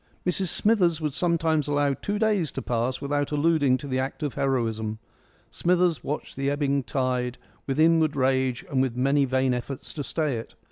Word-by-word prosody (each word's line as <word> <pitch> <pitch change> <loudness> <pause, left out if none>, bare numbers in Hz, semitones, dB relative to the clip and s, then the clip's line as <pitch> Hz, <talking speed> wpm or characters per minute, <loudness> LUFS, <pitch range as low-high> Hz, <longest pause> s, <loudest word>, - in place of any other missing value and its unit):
Mrs 180 +1 0
Smithers 180 -4 +3
would 150 -3 -2
sometimes 165 -3 +1
allow 145 -1 +2
two 205 +9 -3
days 205 - +1
to - - -4
pass 120 +2 -1
without 145 0 -1
alluding 145 -3 +3
to 140 - -8
the 130 -1 -1
act 135 +4 -3
of 145 - -2
heroism. 115 -6 -1 0.5
Smithers 175 -1 +1
watched 150 - -4
the 135 +1 -1
ebbing 140 -1 +1
of 135 - -8
the - - -10
tide 125 -2 -1 0.3
with 135 +1 -1
inward 160 -2 +4
rage 130 -2 +1
and 130 -2 +2
with 130 -3 0
many 140 +3 +2
vain 130 0 +1
efforts 125 +2 -5
to 145 - -4
stay 150 -4 -1
it. 115 - -8
140 Hz, 190 wpm, -26 LUFS, 130-160 Hz, 0.5 s, inward